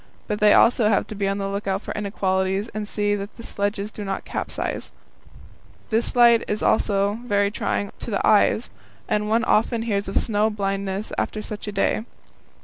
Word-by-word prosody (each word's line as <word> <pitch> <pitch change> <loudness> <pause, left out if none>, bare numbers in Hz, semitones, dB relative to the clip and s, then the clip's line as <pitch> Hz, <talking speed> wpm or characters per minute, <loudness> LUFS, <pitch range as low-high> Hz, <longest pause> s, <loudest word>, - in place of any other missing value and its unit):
But 210 - -3
they 210 0 +6
also 230 -2 +5
have 200 - +2
to - - -8
be 200 -1 -1
on 195 0 0
the 195 -1 -2
lookout 195 0 -2
for - - -5
inequalities, 195 0 -1
and 215 -2 -5
see 205 0 0
that 205 0 -5
the 230 - -9
sledges 205 0 -2
do 210 - -7
not 195 -1 -4
capsize. - - -4 1.0
This 225 +3 +1
light 235 -1 +6
is 210 - -2
also 205 0 +2
very 205 -2 +2
trying 205 -1 -2
to - - -6
the 200 - 0
eyes, 215 +2 +3 0.4
and 210 -1 0
one 225 +1 +2
often 225 +1 +2
hears 205 -3 -1
of 195 - -1
snow 215 -1 +2
blindness 195 -1 -3
after 215 - -2
such 210 0 -6
a - - -2
day. 200 +2 0
205 Hz, 185 wpm, -23 LUFS, 200-215 Hz, 1.0 s, they